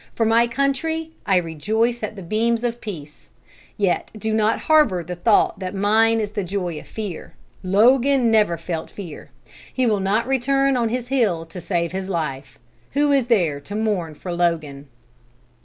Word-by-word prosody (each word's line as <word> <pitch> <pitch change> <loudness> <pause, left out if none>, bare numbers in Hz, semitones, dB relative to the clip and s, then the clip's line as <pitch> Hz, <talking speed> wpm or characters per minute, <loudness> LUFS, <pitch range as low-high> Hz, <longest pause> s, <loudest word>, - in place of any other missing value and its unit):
For 225 - +1
my 230 +2 +4
country, 275 +6 -1 0.2
I 195 - +3
rejoice 215 +9 -1
at 215 0 -4
the 195 - -8
beams 225 +5 0
of 240 0 -2
peace. 155 -8 -9 0.5
Yet 195 -4 0
do 220 +1 -2
not 220 0 +1
harbor 275 - +3
the 180 +2 -6
thought 205 +5 +2
that 185 0 -5
mine 220 +3 +3
is 210 -2 -2
the 210 -2 -2
joy 180 -3 -3
of - - -14
fear. 205 -6 -7 0.3
Logan 240 +6 +4
never 210 -6 +3
felt 165 0 -5
fear. 175 -7 -9 0.4
He 255 - 0
will 215 -4 +2
not 200 +4 +1 0.2
turn 275 +1 +2
on 235 -2 +1
his 245 +1 -3
heel 210 -12 +1
to 165 +2 -9
save 170 -2 -1
his 190 +1 -4
life. 135 -8 -4 0.4
Who 290 +1 +2
is 270 -4 +2
there 175 -12 +2
to 195 +9 -8
mourn 200 -8 -1
for 175 +4 -6
Logan?" 160 -5 -1
210 Hz, 175 wpm, -22 LUFS, 175-235 Hz, 0.5 s, my